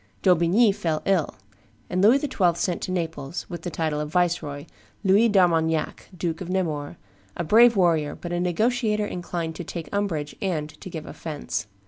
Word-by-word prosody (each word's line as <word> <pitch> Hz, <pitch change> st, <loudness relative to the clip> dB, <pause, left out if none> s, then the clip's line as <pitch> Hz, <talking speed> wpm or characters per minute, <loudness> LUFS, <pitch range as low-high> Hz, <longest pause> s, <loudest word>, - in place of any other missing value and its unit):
D'Aubigny 185 Hz, +5 st, +4 dB
fell 165 Hz, -6 st, -2 dB
ill; 185 Hz, -6 st, +1 dB, 0.5 s
and 185 Hz, -, -1 dB
Louis 225 Hz, +7 st, +6 dB
XII. 200 Hz, -, +1 dB
sent 175 Hz, 0 st, -1 dB
to -, -, -3 dB
Naples, 165 Hz, -3 st, -3 dB
with 175 Hz, -2 st, -6 dB
the 175 Hz, -, -4 dB
title 155 Hz, -2 st, -2 dB
of 150 Hz, 0 st, -3 dB
viceroy, 165 Hz, -4 st, 0 dB, 0.4 s
Louis 205 Hz, +4 st, +5 dB
d'Armagnac, 165 Hz, -5 st, +1 dB
Duke 165 Hz, 0 st, -3 dB
of 180 Hz, -, -5 dB
Nemours, 160 Hz, -6 st, -2 dB, 0.4 s
a -, -, -1 dB
brave 230 Hz, +7 st, +6 dB
warrior, 165 Hz, -6 st, +2 dB
but 175 Hz, 0 st, -6 dB
a 175 Hz, -, 0 dB
negotiator 215 Hz, +4 st, +1 dB
inclined 175 Hz, -3 st, -4 dB
to 175 Hz, -, -5 dB
take 170 Hz, +2 st, -7 dB
umbrage 170 Hz, -8 st, -2 dB
and 160 Hz, -6 st, -1 dB
to 190 Hz, -, -7 dB
give 160 Hz, -3 st, -6 dB
offence. 145 Hz, -8 st, -5 dB
175 Hz, 165 wpm, -25 LUFS, 160-195 Hz, 0.5 s, Louis